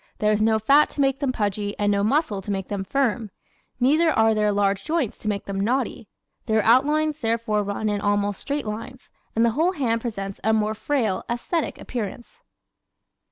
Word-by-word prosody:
There 210 Hz, 0 st, +2 dB
is 215 Hz, 0 st, +1 dB
no 220 Hz, 0 st, +3 dB
fat 275 Hz, +7 st, +4 dB
to -, -, -10 dB
make 270 Hz, 0 st, +2 dB
them 280 Hz, -3 st, 0 dB
pudgy 205 Hz, -3 st, -2 dB
and 205 Hz, 0 st, +1 dB
no 200 Hz, 0 st, +1 dB
muscle 230 Hz, -3 st, +1 dB
to 200 Hz, -, -10 dB
make 195 Hz, -2 st, -3 dB
them 200 Hz, -2 st, -2 dB
firm. 235 Hz, -1 st, 0 dB, 0.5 s
Neither 305 Hz, +7 st, +4 dB
are 225 Hz, -6 st, +3 dB
there 210 Hz, -1 st, +2 dB
large 200 Hz, -1 st, +1 dB
joints 310 Hz, -8 st, -1 dB
to -, -, -7 dB
make 200 Hz, -1 st, -2 dB
them 195 Hz, -1 st, -4 dB
knotty. 240 Hz, +1 st, -1 dB, 0.4 s
Their 220 Hz, -1 st, +2 dB
outlines 295 Hz, +5 st, +3 dB
therefore 225 Hz, -3 st, 0 dB
run 205 Hz, +2 st, -3 dB
in 205 Hz, -1 st, -1 dB
almost 205 Hz, -1 st, 0 dB
straight 290 Hz, -2 st, -3 dB
lines 230 Hz, +5 st, -7 dB, 0.2 s
and 230 Hz, +1 st, +4 dB
the 235 Hz, -, +3 dB
whole 325 Hz, +10 st, +1 dB
hand 235 Hz, -8 st, 0 dB
presents 195 Hz, -5 st, -5 dB
a 220 Hz, +2 st, +3 dB
more 215 Hz, 0 st, +1 dB
frail, 220 Hz, -4 st, -1 dB
aesthetic 270 Hz, +7 st, -2 dB
appearance. 240 Hz, -, -6 dB
220 Hz, 190 wpm, -24 LUFS, 205-265 Hz, 0.5 s, fat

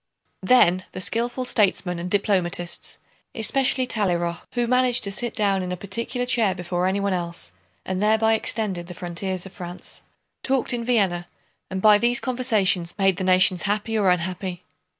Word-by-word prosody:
Then 185 Hz, -4 st, +4 dB
the -, -, -6 dB
skillful 240 Hz, +6 st, -1 dB
statesmen 190 Hz, -6 st, +1 dB
and 175 Hz, +1 st, -4 dB
diplomatists 180 Hz, -3 st, 0 dB, 0.4 s
(especially 255 Hz, +3 st, +1 dB
Talleyrand, 175 Hz, -7 st, -1 dB
who 240 Hz, -1 st, 0 dB
managed 250 Hz, 0 st, +2 dB
to 200 Hz, -, -2 dB
sit 240 Hz, +4 st, -2 dB
down 200 Hz, -3 st, +1 dB
in 180 Hz, 0 st, -4 dB
a 180 Hz, -, -3 dB
particular 230 Hz, +6 st, -2 dB
chair 225 Hz, -6 st, +2 dB
before 180 Hz, 0 st, -2 dB
anyone 200 Hz, +1 st, 0 dB
else 170 Hz, -1 st, -3 dB, 0.3 s
and 185 Hz, 0 st, -3 dB
thereby 220 Hz, +1 st, +3 dB
extended 205 Hz, -5 st, -1 dB
the 180 Hz, -, -9 dB
frontiers 185 Hz, 0 st, -4 dB
of 195 Hz, -, -11 dB
France) 175 Hz, -2 st, -8 dB, 0.4 s
talked 265 Hz, -1 st, +1 dB
in 235 Hz, -1 st, -2 dB
Vienna 195 Hz, -8 st, +1 dB, 0.4 s
and 190 Hz, 0 st, -4 dB
by 210 Hz, -1 st, +7 dB
these 240 Hz, +1 st, +2 dB
conversations 210 Hz, -9 st, 0 dB
made 195 Hz, -2 st, +2 dB
the 190 Hz, -, -3 dB
nations 185 Hz, 0 st, +3 dB
happy 215 Hz, +2 st, -1 dB
or 205 Hz, -3 st, +3 dB
unhappy. 180 Hz, 0 st, -2 dB
195 Hz, 160 wpm, -23 LUFS, 180-225 Hz, 0.4 s, by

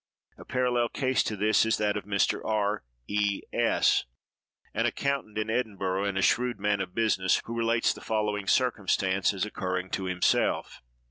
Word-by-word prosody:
A -, -, -13 dB
parallel 125 Hz, -2 st, +1 dB
case 130 Hz, -2 st, +1 dB
to 105 Hz, -, -3 dB
this 105 Hz, +1 st, +3 dB
is 110 Hz, 0 st, +1 dB
that 105 Hz, -1 st, 0 dB
of 105 Hz, -, -4 dB
Mr. 100 Hz, -1 st, +1 dB
R—— 105 Hz, -, 0 dB, 0.2 s
E—— 100 Hz, -1 st, 0 dB
S——, -, -, +2 dB, 0.7 s
an -, -, +1 dB
accountant 140 Hz, -6 st, -2 dB
in 110 Hz, +1 st, -1 dB
Edinburgh, 100 Hz, -5 st, -1 dB
and 100 Hz, -1 st, -2 dB
a 95 Hz, -, +1 dB
shrewd 125 Hz, -3 st, +2 dB
man 105 Hz, 0 st, +1 dB
of 90 Hz, -1 st, -6 dB
business, 95 Hz, -5 st, +2 dB
who 115 Hz, -, -5 dB
relates 115 Hz, 0 st, +2 dB
the -, -, -12 dB
following 105 Hz, -2 st, -1 dB
circumstance 95 Hz, -6 st, +2 dB
as 100 Hz, -1 st, -2 dB
occurring 95 Hz, -3 st, -3 dB
to 95 Hz, -, -2 dB
himself. 90 Hz, -1 st, 0 dB
105 Hz, 165 wpm, -28 LUFS, 95-115 Hz, 0.7 s, this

